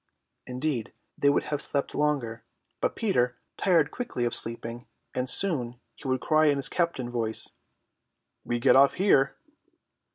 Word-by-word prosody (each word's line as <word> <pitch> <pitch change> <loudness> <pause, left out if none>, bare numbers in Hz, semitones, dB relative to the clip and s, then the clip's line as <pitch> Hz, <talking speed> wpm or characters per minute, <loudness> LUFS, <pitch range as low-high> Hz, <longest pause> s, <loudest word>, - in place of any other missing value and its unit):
Indeed 125 -2 -2 0.2
they 140 - +3
would 140 - +2
have 145 -1 -3
slept 140 -1 0
longer, 140 -7 -1 0.4
but - - 0
Peter 125 - +1 0.2
tired 165 -6 +3
quickly 175 - -3
of 120 - -1
sleeping, 115 +1 -4 0.3
and 125 0 -2
soon 125 -9 0
he 140 - -10
would 130 -1 0
cry 155 0 +3
in 145 - +4
his 140 - 0
captain 165 -9 -1
voice, 115 -2 -2 0.9
"We 120 - -1
get - - +5
off 135 +1 +6
here." 140 -8 +3
135 Hz, 150 wpm, -27 LUFS, 120-150 Hz, 0.9 s, off